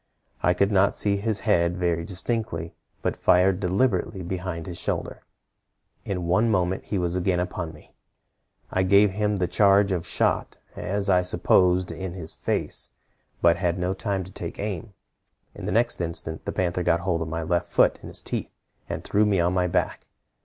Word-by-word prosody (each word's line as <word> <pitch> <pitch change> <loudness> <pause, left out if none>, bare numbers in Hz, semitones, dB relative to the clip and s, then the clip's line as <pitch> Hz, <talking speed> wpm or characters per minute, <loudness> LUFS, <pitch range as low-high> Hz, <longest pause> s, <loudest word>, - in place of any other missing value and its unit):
I 90 - +3
could 100 +3 +2
not 100 0 +3
see 100 -1 +1
his 105 0 -1
head 85 -1 +2
very 85 -2 0
distinctly, 95 -3 -3 0.3
but - - 0
fired 90 +1 +3
deliberately 95 0 0
behind 90 -2 -4
his 85 -1 -6
shoulder. - - -3 0.8
In 90 -3 -3
one 95 +7 +3
moment 95 -2 0
he 105 - -2
was 90 -1 0
again 90 0 +1
upon 90 -2 -3
me. 75 - -17 0.8
I 95 - +1
gave 100 +2 +5
him 105 +1 0
the 90 -2 0
charge 100 0 +4
of 90 -2 -2
shot, - - 0 0.2
as 100 +1 -2
I 90 -2 +4
supposed, 90 0 +3
in 95 -2 -5
his 80 -4 -5
face, - - -1 0.5
but 85 0 +5
had 90 -1 0
no 90 +1 0
time 95 -1 -2
to 95 - -11
take - - -6
aim. 105 0 -5 0.6
In - - -8
the - - -1
next 115 -4 +2
instant 80 -1 -4
the - - -2
panther 90 -1 -1
got 85 -1 +2
hold 85 -2 0
of 80 - -2
my 80 +1 -3
left 85 +1 0
foot - - +3
in - - -9
his - - -4
teeth, - - -3 0.4
and - - -4
threw 105 - +2
me 100 -3 +2
on 85 +1 +2
my 90 -1 +2
back. 85 - -1
90 Hz, 185 wpm, -25 LUFS, 85-100 Hz, 0.8 s, gave